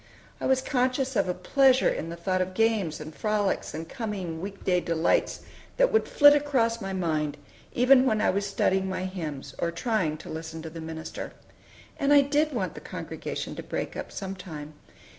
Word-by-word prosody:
I - - -1
was 260 0 +2
conscious 260 0 0
of 200 -3 +2
a - - +1
pleasure 260 +7 +4
in 165 - -1
the 170 - -5
thought 185 +2 -1
of 185 0 -3
games 215 -8 +1
and 155 +1 -8
frolics 210 -4 -1
and 160 +1 -5
coming 190 -8 -4
week 195 +1 -7
day 180 -1 +3
delights 165 -1 +1 0.4
that - - +4
would 445 - +2
flit 290 -1 +7
across 260 -6 +1
my 195 - -4
mind 155 -5 -1 0.4
even 255 +1 +5
when 220 -3 +2
I - - +3
was 200 +1 -1
studying 190 -1 +1
my 185 0 -2
hymns, 150 -7 -5
or 170 - +1
trying 170 -3 -1
to - - -12
listen 160 0 -6
to 160 - -7
the 165 0 -7
minister. 160 0 -6 0.7
And 280 0 +2
I 290 -1 +8
did 295 +2 +1
want 205 -9 -2
the - - -9
congregation - - -5
to - - -4
break - - -4
up - - -6
some 195 -1 -5
time. 155 -5 -8
190 Hz, 195 wpm, -27 LUFS, 165-250 Hz, 0.7 s, I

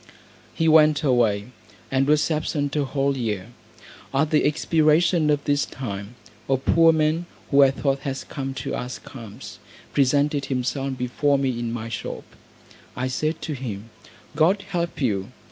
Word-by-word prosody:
He 165 - +1
went 155 -1 +5
away, 120 -5 +2 0.4
and 135 +1 +2
was 150 +2 +3
absent 150 -2 -1
a 145 -2 +1
whole 140 0 0
year. 110 -5 -3 0.6
At 145 +3 +1
the 155 - +3
expiration 155 +1 +3
of 145 -1 +1
this 145 0 +1
time, 105 -3 -6 0.3
a 135 - +3
poor 165 +5 +4
man, 160 +2 +1 0.2
who 140 0 +6
I 135 - +7
thought 135 0 -1
had 135 -1 -5
come 135 -2 -5
to - - -3
ask 125 +2 -6
alms, 115 0 -10 0.3
presented 140 +1 +2
himself 135 +1 -2
before 135 +3 +1
me 135 -1 0
in 120 -1 -3
my 115 -1 -4
shop. 115 - -5 0.7
I 130 +1 -2
said 155 +5 -2
to 155 - -3
him, 115 -5 -6 0.4
"God 180 +6 +3
help 170 -1 -2
you." 100 -7 0
140 Hz, 155 wpm, -23 LUFS, 125-150 Hz, 0.7 s, I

